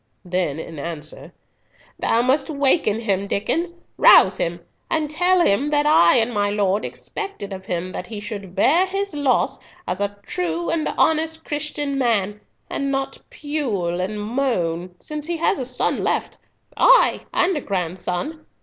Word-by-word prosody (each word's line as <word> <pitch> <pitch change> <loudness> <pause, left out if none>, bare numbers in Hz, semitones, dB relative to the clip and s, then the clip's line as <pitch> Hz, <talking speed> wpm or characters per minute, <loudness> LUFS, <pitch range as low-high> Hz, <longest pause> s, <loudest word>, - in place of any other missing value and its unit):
Then 175 -5 -1
in 160 -1 -7
answer, 155 -1 -6 0.7
"Thou 230 +1 +2
must 270 +4 +1
waken 275 -6 +2
him, 200 -3 -1
Diccon—rouse 315 - +3
him, 170 +1 -1 0.3
and 310 -2 -1
tell 360 +3 +4
him 265 +9 +2
that 295 0 +2
I 170 - +6
and 235 +1 +1
my 205 -1 +1
lord 205 0 0
expect 400 - -6
it 200 0 -5
of 190 0 -9
him 180 +1 -3
that 180 - -6
he 215 -2 -6
should 200 -3 -7
bear 330 - +4
his 395 0 -3
loss 285 -3 +1 0.3
as 180 +2 -3
a 205 0 -2
true 170 -1 -2
and 320 -2 0
honest 320 0 +1
Christian 295 -2 -3
man, 210 -4 0 0.3
and 275 0 -2
not 270 0 -3
pule 215 - -2
and 210 +3 -3
moan, 185 -7 -2
since 300 0 -5
he 340 -1 -2
has 325 - +1
a 255 - -2
son 250 0 -1
left—ay, - - +2
and 365 0 +2
a 295 - -2
grandson. 185 - -3
225 Hz, 155 wpm, -21 LUFS, 185-300 Hz, 0.7 s, I